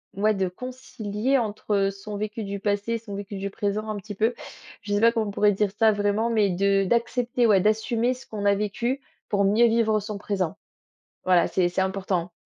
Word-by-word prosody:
ouais, 215 +2 +2
de 190 -2 0
concilier 250 +2 -2
entre 205 -3 0
son 205 +1 -7
vécu 215 +1 -4
du 200 0 -4
passé 205 +3 -1
et - - +1
son 215 -3 -8
vécu 200 0 -6
du 200 +1 -3
présent 210 +2 -2
un 215 - -2
petit 205 0 -8
peu. 225 +4 +1 0.5
Je 205 0 -4
sais 205 - +1
pas 230 - +6
comment 225 -2 -1
on 205 - -3
pourrait 205 +1 +3
dire 200 0 0
ça 220 -1 +5
vraiment? 205 +2 0
Mais 215 -3 +2
de 195 +2 +2
d'accepter, 240 +3 +1
ouais, 200 -4 +5
d'assumer 225 +4 +1
ce 255 - -13
qu'on 205 -2 -5
a 200 - +4
vécu 225 +6 -2 0.3
pour 200 -1 +2
mieux 225 +4 +5
vivre 225 -1 +2
son 210 0 -5
présent. 195 -2 -2 0.7
Voilà, 180 -2 +4
c'est 180 -2 +1
c'est 180 +2 0
important. 190 -2 -2
210 Hz, 205 wpm, -25 LUFS, 200-225 Hz, 0.7 s, pas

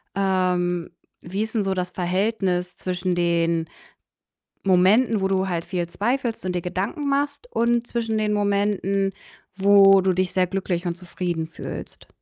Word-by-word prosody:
Ähm, 180 -3 0 0.3
wie 190 +5 -4
ist 220 +1 -6
'n 220 - +2
so 195 -1 0
das 180 -1 -3
Verhältnis 185 -1 -1
zwischen 180 0 -2
den 170 -1 +1 1.0
Momenten, 200 +5 +4
wo 190 - +1
du 190 0 0
halt 170 -2 -2
viel 175 -2 -2
zweifelst 235 +2 -2
und 180 -1 -2
dir 175 - -1
Gedanken 200 - -3
machst, 285 +9 -1
und 235 0 +1
zwischen 225 -2 -2
den 215 -1 0
Momenten, 200 -1 +1 0.5
wo 195 0 +7
du 185 0 +2
dich 185 0 0
sehr 185 -1 +2
glücklich 180 -2 -2
und 170 - -2
zufrieden 175 -2 -4
fühlst? - - -8
190 Hz, 150 wpm, -23 LUFS, 180-210 Hz, 1.0 s, wo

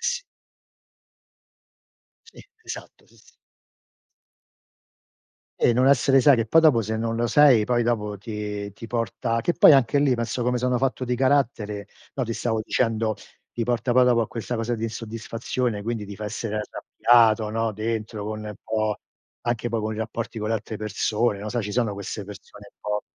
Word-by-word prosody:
s 485 0 -1 2.0
Sì, 455 - -15 0.2
esatto, - - -9
sì, - - -24
s - - -23 2.2
E - - +4
non 125 +2 +3
essere 135 0 +5
sai 140 +2 +6
che 115 -2 0
poi 165 +9 +5
dopo 150 -8 +5
se 110 +1 -3
non 115 +1 -2
lo 120 +1 0
sei, 135 -7 +6
poi 120 +1 +1
dopo 105 -3 -1
ti 105 -1 -5
ti 115 +3 -10
porta 115 0 -1
che 175 - +1
poi - - +7
anche 135 0 +4
lì, 140 -2 +3
penso 120 +1 -2
come 125 +1 +1
sono 125 0 +1
fatto 130 0 -1
di 125 0 -1
carattere, 120 -6 0 0.3
no, 130 - -1
ti 115 - -3
stavo 110 -1 -1
dicendo, 110 -1 0 0.4
ti 120 - -3
porta 120 +1 0
poi 125 +1 +5
dopo 120 -2 +4
a 115 - 0
questa 120 +2 -4
cosa 115 +1 -1
di 110 - -6
insoddisfazione, 115 0 -3
quindi 115 -1 -3
ti 100 -1 -8
fa 105 - -6
essere 110 0 -4
arrabbiato, 110 0 +2
no, 115 0 -1
dentro 110 0 -3
con 110 0 -5
un 105 0 -6
po' 110 -1 -1 0.4
anche 120 0 -1
poi 115 -1 -1
con 110 +1 -3
i - - -7
rapporti 115 0 -4
con 105 - -2
le 115 - +1
altre 110 0 -5
persone, 105 +1 -1
non 105 +1 -5
so, 120 0 -1
ci 105 - -4
sono 115 -1 0
queste 100 +1 -6
persone 100 0 -12
un - - -70
po' 105 0 -2
115 Hz, 185 wpm, -24 LUFS, 105-120 Hz, 2.2 s, poi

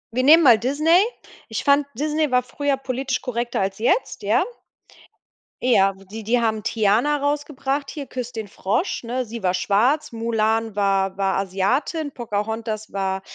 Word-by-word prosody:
Wir 255 - +2
nehmen 315 +5 +7
mal 235 -5 +7
Disney. 305 - +3 0.5
Ich 225 - -3
fand, 280 0 +3
Disney 305 +3 0
war 250 0 +2
früher 280 +1 -1
politisch 265 0 -2
korrekter 240 -3 -2
als 195 +1 -2
jetzt, 245 - 0
ja? - - +2 1.2
Ja, 195 -6 +4
die 195 +3 -10
die 235 +3 +1
haben 220 -2 0
Tiana 225 +9 +2
rausgebracht 285 -1 -2
hier, 290 -3 -6
„Küss 250 -1 -5
den 220 -2 -5
Frosch“, 205 - -2
ne? 250 +2 -2
Sie 230 -1 -8
war 180 -1 +2
schwarz, 220 +11 +1
Mulan 225 -1 0
war 195 -1 +1
war 195 -1 +1
Asiatin, 205 - -1
Pocahontas 220 -2 -4
war, 190 -1 -2
235 Hz, 155 wpm, -22 LUFS, 205-275 Hz, 1.2 s, nehmen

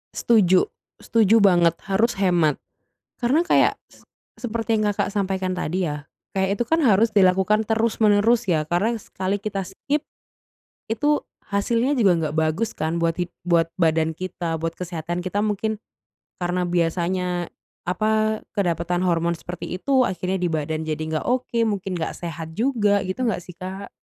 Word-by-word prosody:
Setuju 190 -6 +4 0.3
setuju 225 -1 +3
banget, 175 -4 +4
harus 200 +4 +1
hemat. 175 -6 +2 0.6
Karena 265 +6 +3
kayak - - +4 0.2
se - - -21 0.3
seperti 225 -2 -1
yang 215 - +1
Kakak - - -1
sampaikan 190 -2 -1
tadi 180 0 -2
ya, 150 -2 -4 0.2
kayak 190 +1 0
itu 240 - 0
kan 325 +8 +1
harus 225 -5 +4
dilakukan 200 +2 +3
terus 225 0 0
menerus, 220 +2 +3
ya? 160 -4 +2
Karena 205 +7 +1
sekali 195 -2 -3
kita 200 -2 -3
skip 280 +9 -3 0.9
itu 290 +7 +1 0.2
hasilnya 230 +7 +1
juga 210 -7 +4
nggak 155 -2 -2
bagus 160 +7 0
kan 160 +2 -1
buat 165 -1 +1
hid 175 0 -3 0.2
buat 165 -1 +3
badan 160 -1 +2
kita, 170 -3 -3
buat 165 0 -2
kesehatan 175 -1 -4
kita. 185 +2 -2
Mungkin 215 +1 -1 0.6
karena 180 0 0
biasanya, 175 +1 -1 0.3
apa, 215 +3 +1 0.2
kedapatan 175 -1 0
hormon 170 -1 +1
seperti 175 +1 -6
itu 260 +4 +2
akhirnya 185 +1 -2
di 175 - +1
badan 155 0 -2
jadi 155 -1 -2
nggak 155 -1 -3
oke, 250 -2 0
mungkin 195 -2 -3
nggak 160 - -3
sehat 165 -1 -6
juga, 210 -5 +2
gitu 185 +6 -4
nggak 220 - -1
sih, 180 - -11
Kak? 190 +3 -7
185 Hz, 155 wpm, -23 LUFS, 170-215 Hz, 0.9 s, Setuju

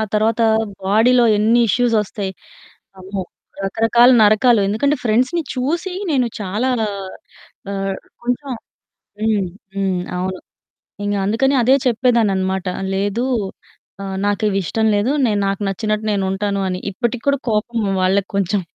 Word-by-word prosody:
ఆ - - +1
తరవాతా 225 +2 +2 0.4
బాడీలో 235 +5 +4
ఎన్ని 225 +3 +3
ఇష్యూసొస్తాయి. 210 -4 0 0.7
అమ్మో! 190 +1 -5 0.4
రకరకాల 225 +4 +4
నరకాలు. 215 +2 +5
ఎందుకంటే, 280 +8 +1
ఫ్రెండ్స్‌ని 255 +9 +1
చూసి, 330 +9 -2 0.2
నేను 260 -5 +2
చాలా 210 +6 -1 1.0
ఆహ్, 195 -1 -2 0.3
కొంచుం 250 +3 -2 0.7
హ్మ్. 210 -4 +1 0.3
హ్మ్. 190 -2 0 0.2
అవును. 185 +1 -3 0.7
ఇంగ 205 0 -1
అందుకనే 265 +7 +2
అదే 255 +3 +5
చెప్పేదాన్ననమాట, 210 -6 +1 0.3
"లేదూ, 205 +5 -1 0.8
ఆహ్, 195 -1 -4
నాకివిష్టం 205 +1 0
లేదు. 210 +6 +1
నేను 210 -3 +1
నాకు 195 +1 -2
నచ్చినట్టు 215 +2 -2
నేనుంటాను" 200 0 -1
అని. 180 0 -3
ఇప్పటికి 235 +3 -2
కూడా 280 -1 +3
కోపము 215 0 -1
వాళ్ళకు 190 +1 +1
కొంచెం 200 0 +1
215 Hz, 115 wpm, -19 LUFS, 195-240 Hz, 1.0 s, నరకాలు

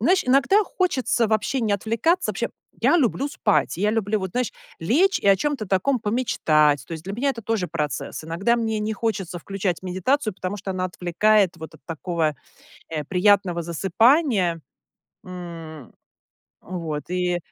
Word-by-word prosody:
знаешь, 360 - +3
иногда 275 +12 +4
хочется 260 - 0
вообще 220 +4 0
не 215 -3 0
отвлекаться. 230 - +1
Вообще, - - -2 0.3
я 345 - +4
люблю 275 0 +1
спать, 150 - +1
я 205 +3 +1
люблю 215 -1 0
вот, 190 -2 -4
знаешь, 250 -3 -1 0.3
лечь 325 - +3
и - - -3
о 195 - +7
чём-то 285 -3 -2
таком 195 +8 +1
помечтать. 155 - +2
То - - -9
есть 160 +1 -9
для 195 - -5
меня 260 +6 -1
это 235 -3 -6
тоже 215 -4 -1
процесс. 155 -1 -4
Иногда 195 +9 +1
мне 220 -2 -1
не 215 +1 -1
хочется 200 -5 -3
включать 190 -1 -3
медитацию, 190 +5 0
потому 185 +2 -4
что 195 0 -6
она 185 0 -2
отвлекает 185 +2 +2
вот 160 0 -9
от - - -16
такого, 165 +1 -3 0.7
э, 155 -2 -3
приятного 190 -2 +3
засыпания, 190 - +2 0.6
м. 165 -6 -9 0.7
Вот 165 -4 -5
и 180 -1 0
195 Hz, 160 wpm, -23 LUFS, 175-230 Hz, 0.7 s, о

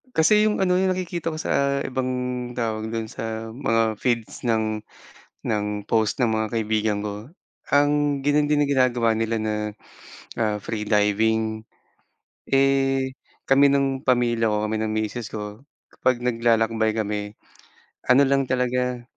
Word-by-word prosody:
Kasi 210 +7 +5
yung 215 0 +1
ano, 185 -2 +2
yung 190 +1 +2
nakikita 175 -2 -3
ko 155 - -6
sa 140 -3 +1
ibang 130 0 -2 0.4
tawag 110 -2 -3
dun 115 -1 -3
sa 110 0 -5
mga 115 -4 +1
feeds 115 0 -2
ng 110 -2 0 0.6
ng 105 -2 0 0.2
post 110 -1 +1
ng 125 - +3
mga 110 -1 0
kaibigan 110 -1 0
ko. 105 +5 -7 0.4
Ang 145 0 +3
ganyan 145 +2 +1
din 145 -1 +3
ginagawa 125 -4 +2
nila 115 0 -1
na, 110 0 -1 0.8
ah, 105 -2 0
free 110 0 -4
diving. 110 +1 +1 0.9
Eh, 135 -1 +2 0.4
kami 140 +1 +6
ng 135 -1 0
pamilya 120 -2 +2
ko 105 0 0
kami 110 - -1
ng 110 0 -1
misis 110 +1 -3
ko. 105 0 -7 0.3
Kapag 125 -1 0
naglalakbay 115 -2 +2
kami. 105 -1 -3 0.7
Ano 130 +2 +7
lang 135 0 +2
talaga. 125 -1 0
115 Hz, 140 wpm, -23 LUFS, 110-135 Hz, 0.9 s, Ano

